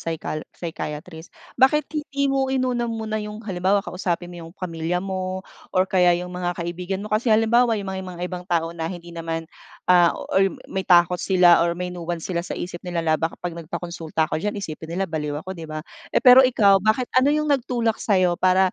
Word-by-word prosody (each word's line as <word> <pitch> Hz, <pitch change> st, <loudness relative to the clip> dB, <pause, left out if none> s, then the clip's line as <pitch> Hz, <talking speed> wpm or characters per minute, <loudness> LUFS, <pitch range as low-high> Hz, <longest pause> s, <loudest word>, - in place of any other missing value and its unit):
psychal 160 Hz, -1 st, -4 dB
psychiatrist. 160 Hz, 0 st, -7 dB, 0.3 s
Bakit 300 Hz, +4 st, +5 dB
hindi 295 Hz, -2 st, -2 dB
mo 270 Hz, -1 st, +1 dB
inuna 255 Hz, -2 st, 0 dB
muna 220 Hz, -1 st, -3 dB
yung 210 Hz, 0 st, -6 dB
halimbawa 195 Hz, +1 st, +1 dB
kausapin 175 Hz, -1 st, -3 dB
mo 175 Hz, -, -9 dB
yung -, -, -15 dB
pamilya 165 Hz, -1 st, -3 dB
mo 185 Hz, 0 st, -4 dB, 0.3 s
or 185 Hz, -, +5 dB
kaya 180 Hz, -2 st, +3 dB
yung 180 Hz, -, -9 dB
mga 180 Hz, 0 st, -3 dB
kaibigan 180 Hz, +3 st, -4 dB
mo. 215 Hz, -, -7 dB
Kasi 215 Hz, +3 st, +1 dB
halimbawa, 225 Hz, +1 st, +4 dB
yung 200 Hz, -, -5 dB
mga 190 Hz, 0 st, -4 dB
mga 175 Hz, -, -7 dB
ibang 180 Hz, 0 st, -5 dB
tao 165 Hz, -2 st, 0 dB
na 165 Hz, -1 st, -4 dB
hindi 175 Hz, -1 st, -8 dB
naman, 165 Hz, -1 st, -4 dB, 0.5 s
ah 175 Hz, -2 st, +5 dB, 0.2 s
or 195 Hz, 0 st, +4 dB, 0.2 s
may 190 Hz, -, -1 dB
takot 175 Hz, 0 st, +5 dB
sila 180 Hz, -3 st, +5 dB
or 170 Hz, 0 st, +1 dB
may 180 Hz, 0 st, -4 dB
nuance 170 Hz, -1 st, -5 dB
sila 170 Hz, -, 0 dB
sa 175 Hz, -, -6 dB
isip 175 Hz, -1 st, -5 dB
nila 175 Hz, -2 st, -3 dB
na, 160 Hz, -1 st, +3 dB
"Baka 165 Hz, 0 st, -2 dB
pag 175 Hz, -1 st, -5 dB
nagpakonsulta 165 Hz, -1 st, -3 dB
ako 155 Hz, -, -3 dB
diyan 210 Hz, +3 st, -2 dB
isipin 160 Hz, -5 st, -6 dB
nila 195 Hz, -, +1 dB
baliw 150 Hz, -4 st, -3 dB
ako" 190 Hz, -, -5 dB
'di 165 Hz, -4 st, -9 dB
ba. 155 Hz, 0 st, -6 dB, 0.3 s
Eh, -, -, +2 dB
pero 250 Hz, 0 st, +10 dB
ikaw, 210 Hz, -7 st, +5 dB
bakit 215 Hz, +5 st, +1 dB
ano 255 Hz, +2 st, +4 dB
yung 300 Hz, 0 st, +2 dB
nagtulak 240 Hz, -4 st, 0 dB
sa'yo 185 Hz, -4 st, +2 dB
para 185 Hz, 0 st, +4 dB
180 Hz, 200 wpm, -23 LUFS, 170-215 Hz, 0.5 s, pero